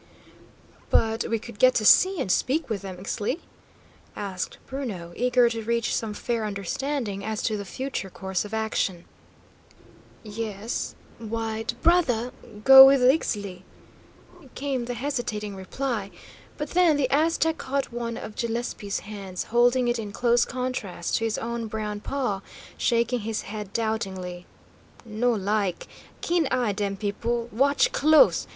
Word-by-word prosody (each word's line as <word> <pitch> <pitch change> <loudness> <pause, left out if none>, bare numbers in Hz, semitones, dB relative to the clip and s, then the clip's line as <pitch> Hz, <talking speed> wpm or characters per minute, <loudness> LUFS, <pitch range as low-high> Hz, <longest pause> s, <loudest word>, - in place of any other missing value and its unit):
"But 225 0 +2
we 230 - +1
could 225 -1 -11
get 255 +2 +6
to 215 - +1
see 375 - +6
and 210 -9 0
speak 290 - +1
with 205 -3 -2
them, 190 -2 -7
Ixtli?" 205 - -3 0.8
asked 190 -3 -4
Bruno, 205 -11 -5
eager 250 0 +3
to 230 -1 -4
reach 235 +1 0
some 215 -2 -3
fair 230 +1 -2
understanding 210 +2 -3
as 215 0 -3
to 220 - 0
the 200 -1 -5
future 260 -3 -4
course 190 0 -3
of 210 - -9
action. 220 -5 -1 1.2
"Yes, 215 0 -4 0.2
white 225 +1 -3
brother, 260 -9 +3 0.3
go 265 +1 +11
with 270 -1 +5
Ixtli," 205 - +1 0.9
came 270 -3 -2
the 245 0 -4
hesitating 235 -6 -3
reply; 210 +2 -3 0.5
but 295 -1 -4
then 345 -4 +4
the 275 -3 +2
Aztec 320 +2 +2
caught 275 -1 -2
one 235 -1 -3
of 215 - -8
Gillespie's 230 -3 -3
hands, 195 -3 -6
holding 245 +1 +4
it 240 -1 +1
in 210 -2 -5
close 240 +2 +2
contrast 250 -9 -3
to 225 - -1
his 225 - -1
own 235 0 -3
brown 210 -1 -4
paw, 245 -4 -2 0.3
shaking 235 +1 +1
his 220 0 -3
head 210 -2 -7
doubtingly. 190 -6 -3 0.6
"No 230 +2 0
like. 205 -3 -1 0.4
Keen 340 -3 +1
eye, 250 -5 +1
dem 200 -1 -2
people. 230 +4 -2
Watch 275 +6 +3
close. 310 - +5
225 Hz, 140 wpm, -26 LUFS, 205-255 Hz, 1.2 s, go